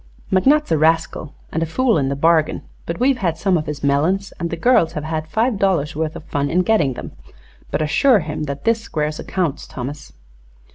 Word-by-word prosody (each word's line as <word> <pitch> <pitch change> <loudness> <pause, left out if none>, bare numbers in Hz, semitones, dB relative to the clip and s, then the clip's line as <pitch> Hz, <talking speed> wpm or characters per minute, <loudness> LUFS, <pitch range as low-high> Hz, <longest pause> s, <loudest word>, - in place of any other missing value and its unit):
McNutt's 275 - +3
a 160 - +3
rascal, 160 -1 +1 0.2
and 160 - -2
a 165 - 0
fool 245 +7 +2
in 135 -1 0
the 140 - -1
bargain; 160 +1 +2 0.2
but 170 - -4
we've 260 0 +2
had 170 -6 -1
some 190 0 +1
of 155 -2 -1
his 150 -1 -5
melons 165 +8 +1
and 170 -1 -2
the 170 - -3
girls 170 -4 +3
have 150 - -4
had 155 0 -3
five 220 +4 0
dollars' 165 -7 +1
worth 160 0 -2
of - - -8
fun 145 -2 -2
in 180 +2 +2
getting 180 -11 +2
them. - - -8 0.6
But 155 - -1
assure 220 - +4
him 150 0 -4
that 140 -1 -5
this 230 -1 +2
squares 150 -6 -3
accounts, 170 -7 -2
Thomas." 140 +3 -7
160 Hz, 205 wpm, -20 LUFS, 150-195 Hz, 0.6 s, assure